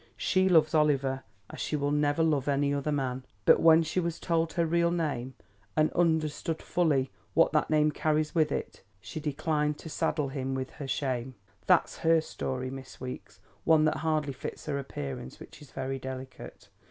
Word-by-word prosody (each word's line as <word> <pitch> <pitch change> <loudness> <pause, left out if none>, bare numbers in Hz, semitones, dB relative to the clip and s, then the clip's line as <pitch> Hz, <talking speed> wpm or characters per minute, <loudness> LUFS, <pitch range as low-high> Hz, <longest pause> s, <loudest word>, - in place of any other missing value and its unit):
She 185 0 +2
loves 160 -3 +4
Oliver 140 -4 +2 0.3
as - - -9
she - - -2
will 145 -1 0
never 150 +2 +2
love 150 -4 +1
any 140 0 +2
other 145 +1 -1
man, 130 -3 -2 0.2
but - - +7
when 165 0 +6
she 175 - -1
was 170 -1 -2
told 165 -1 0
her 170 - +1
real 170 +1 +2
name 145 -7 -2 0.4
and 155 0 +3
understood 160 -1 0
fully 145 -7 +1 0.2
what 165 - +5
that 150 - +1
name 155 -1 +3
carries 155 0 0
with 155 -3 +2
it, - - -4 0.2
she 155 - -7
declined 150 0 -1
to 160 - -9
saddle 150 -2 -1
him 135 -1 -3
with 130 0 -4
her 145 -3 -7
shame. 130 -2 -2 0.3
That's - - +3
her 165 0 +4
story, 130 -4 -4
Miss 135 -1 -9
Weeks; 125 0 -8 0.2
one 155 -1 +5
that 155 - +1
hardly 155 -3 0
fits 130 - -7
her 140 -2 -2
appearance 70 - -6
which - - -13
is 145 - -13
very 135 0 -4
delicate. 130 0 -8
150 Hz, 180 wpm, -29 LUFS, 135-160 Hz, 0.4 s, but